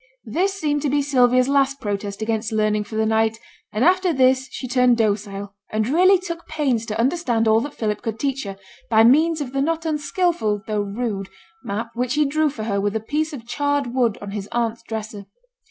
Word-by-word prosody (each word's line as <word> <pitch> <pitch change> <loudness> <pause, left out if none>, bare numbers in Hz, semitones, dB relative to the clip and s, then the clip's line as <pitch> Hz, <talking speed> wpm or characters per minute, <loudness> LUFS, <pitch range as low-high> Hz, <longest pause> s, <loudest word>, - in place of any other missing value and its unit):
This 370 - 0
seemed 295 -6 -1
to 290 - 0
be 285 +1 +1
Sylvia's 255 -2 +3
last 275 0 +2
protest 205 -1 -3
against 220 0 -1
learning 215 -1 +1
for 220 - -9
the 220 0 +1
night, 220 0 +1 0.3
for 215 +3 0
after 370 +1 +4
this 260 -2 +3
she 255 - -6
turned 250 -1 +3
docile, 205 -2 -1 0.2
and 215 0 0
really 365 +8 +5
took 345 -2 -7
pains 265 -8 -1
to 215 - -3
understand 245 -4 +1
all 220 +1 +4
that 290 +3 -6
Philip 210 -2 -2
could 225 -1 -4
teach 275 0 -1
her, 195 -1 -6 0.3
by 220 0 +5
means 310 +6 +4
of 265 -2 -5
the 275 - 0
not 325 +2 -1
unskilful, 300 - 0
though 210 -1 -1
rude, 205 -1 -3 0.3
map 225 +3 -4
which 250 +2 -1
he 300 0 +3
drew 305 +2 +1
for 240 -6 -6
her 200 -2 -1
with 205 +1 -1
a - - +1
piece 300 +8 -2
of 255 -6 -8
charred 285 -1 -1
wood 240 -5 +1
on 200 - -6
his 205 0 -5
aunt's 230 -1 -1
dresser. 215 -3 -6
240 Hz, 205 wpm, -22 LUFS, 215-290 Hz, 0.3 s, really